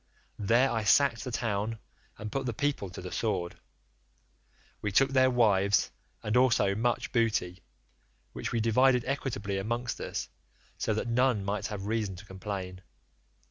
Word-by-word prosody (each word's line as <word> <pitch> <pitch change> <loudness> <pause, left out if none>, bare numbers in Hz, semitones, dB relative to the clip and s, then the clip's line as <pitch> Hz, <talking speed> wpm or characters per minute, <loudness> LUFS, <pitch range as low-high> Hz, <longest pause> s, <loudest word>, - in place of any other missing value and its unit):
There 120 +6 +3
I 115 -2 -1
sacked 120 +3 +4
the 130 - -4
town 110 -1 -1 0.4
and 105 0 -6
put 135 -1 -2
the 120 - -2
people 145 -8 -1
to 90 - -9
the 90 - -6
sword. 95 -6 -2 1.2
We 105 - -2
took 135 +7 +4
their 130 -1 +4
wives 100 -5 +3 0.3
and 105 +2 -1
also 120 -6 +4
much 120 +3 -1
booty, 110 -7 0 0.7
which - - -4
we 115 - 0
divided 125 +2 +3
equitably 110 -8 -2
amongst 120 +4 -3
us, - - -4 0.5
so 110 - -1
that 110 - -2
none 120 -3 +2
might 100 0 -2
have 100 -2 -5
reason 105 -3 -1
to 95 +3 -11
complain. 95 -1 -6
110 Hz, 150 wpm, -29 LUFS, 100-125 Hz, 1.2 s, sacked